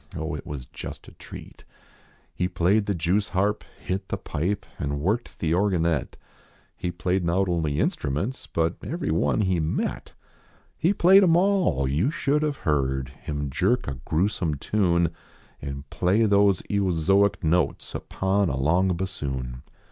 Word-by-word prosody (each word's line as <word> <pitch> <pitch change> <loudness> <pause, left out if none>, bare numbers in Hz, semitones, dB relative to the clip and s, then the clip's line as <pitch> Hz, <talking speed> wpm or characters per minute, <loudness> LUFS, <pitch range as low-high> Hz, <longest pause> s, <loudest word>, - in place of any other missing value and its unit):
Oh, 80 -1 -3
it 75 - -6
was 70 -4 -6
just - - -9
a - - -11
treat, - - -12 0.8
lie 90 - +2
played 90 +4 +2
the 100 - 0
jevvsharp, 95 +4 0 0.2
hit 95 +1 -3
the - - -1
pipe, 90 +7 -2
And 70 0 -2
worked 105 +10 -1
the 80 - -1
organette; 85 -6 +1 0.6
He 90 - -3
played 90 +2 -1
not 90 +3 +1
only 80 -5 0
instruments, 85 - -2
But 85 +1 0
everyone 110 - 0
he 95 -4 +1
met. 80 0 -2 0.6
He 170 - +2
played 190 0 +6
em 170 -4 +5
all; 180 - +2
you 75 - +1
should 150 -1 0
have 150 -2 -1
heard 65 -3 0
Him 70 0 -5
jerk 100 - +1
a 65 -2 -4
grewsome 85 -1 0
tune 85 +1 +1 0.5
And 70 0 -6
play 90 +6 +2
those 100 -2 +3
eozoic 95 0 +2
notes 85 +2 0
Upon 95 0 0
a 65 - -2
long 85 +6 +2
bassoon. 65 -9 -4
90 Hz, 145 wpm, -25 LUFS, 75-100 Hz, 0.8 s, played